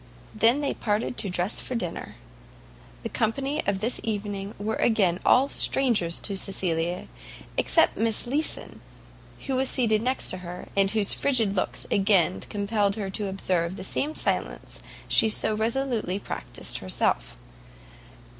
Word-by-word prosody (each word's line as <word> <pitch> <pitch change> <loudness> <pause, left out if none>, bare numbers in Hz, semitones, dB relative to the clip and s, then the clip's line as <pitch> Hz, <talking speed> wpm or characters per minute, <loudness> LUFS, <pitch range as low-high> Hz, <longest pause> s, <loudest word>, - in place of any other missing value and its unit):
They 225 +2 +5
then 285 +2 -1
parted 215 +3 -1
to 200 - -2
dress 180 +3 -1
for 255 - -4
dinner. 180 -8 -5 0.9
The - - -3
company 275 +7 -1
of 200 -1 0
this 230 +3 -1
evening 205 -2 -4
were 215 +2 -2
again 190 -6 +2
all 265 +2 +5
strangers 230 -14 +2
to 200 -2 -2
Cecilia, 175 -3 -1 0.5
except - - +3
Miss 225 -1 +2
Leeson, 285 +6 -1 0.6
who 265 -2 -1
was 265 0 +1
seated 220 -4 +2
next 255 +3 0
to 185 - -3
her, 180 0 -8
and 195 -1 +3
whose 210 -1 +2
frigid 230 -8 +2
looks 185 - -2
again 195 -2 +3
compelled 205 -1 -1
her 200 -3 -4
to 205 +1 -2
observe 185 -2 -1
the - - -7
same 295 +10 -1
silence - - -2 0.3
she 220 - +5
so 215 0 +3
resolutely 225 -3 -1
practised - - -5
herself. - - -1
210 Hz, 145 wpm, -26 LUFS, 190-235 Hz, 0.9 s, They